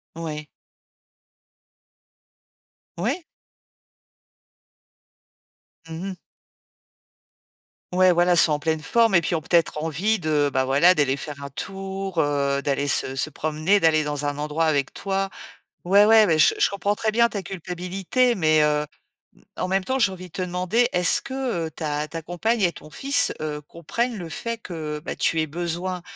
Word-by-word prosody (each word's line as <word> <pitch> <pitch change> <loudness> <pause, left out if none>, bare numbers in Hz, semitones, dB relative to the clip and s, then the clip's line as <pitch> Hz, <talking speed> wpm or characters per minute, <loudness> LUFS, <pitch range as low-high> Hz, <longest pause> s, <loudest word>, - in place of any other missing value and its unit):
Oui. 155 -2 -5 2.5
Ouais. 360 - -2 2.7
Mmh 165 +3 -6
mh. 185 - -6 1.8
Ouais, 185 0 +5
voilà, 175 0 +3
sont 160 - +6
en 150 - -1
pleine 160 0 -1
forme. 230 +5 +2
Et 170 - +5
puis, 165 - -1
ont 160 - -2
peut-être 165 -1 +1
envie 180 +8 0
de 150 -3 +1
bah, 130 0 +1
voilà, 165 +8 +5
d'aller 140 -3 +2
faire 145 -2 -7
un 140 - -6
tour, 195 +2 -5
heu, 140 -1 +1
d'aller 140 0 -1
se 135 0 +1
se 135 +4 0
promener, 155 +7 0
d'aller 160 -2 +3
dans 145 -1 -3
un 145 0 -2
endroit 150 +2 -1
avec 145 -3 0
toi. 195 0 -2 0.6
Ouais, 200 +3 +5
ouais, 220 -1 +6
bah, 165 - +2
je - - +5
je - - +3
comprends 200 +1 -1
très 220 +1 -1
bien 235 +2 +3
ta 200 -3 -5
culpabilité, 185 +7 -1
mais 155 -3 +3
heu, 150 0 +1 0.5
mmh, - - -25 0.2
en - - -2
même 190 0 0
temps, 265 +5 -1
j'ai 205 -6 +2
envie 185 0 -9
de - - -27
te 185 - -4
demander, 185 +6 0
est-ce 180 -1 +4
que, 255 -11 -3
heu, - - -6
ta 150 -1 -3
ta 165 0 -6
compagne 205 +7 -1
et 175 -2 +3
ton 150 - -13
fils, 275 - +2
heu, 150 -1 -4
comprennent 220 +10 -3
le 170 -3 -6
fait 230 +7 -4
que, 155 -3 -5
bah, - - -5
tu 160 - +1
aies 155 - 0
besoin, 175 +3 -4
170 Hz, 165 wpm, -23 LUFS, 150-195 Hz, 2.7 s, sont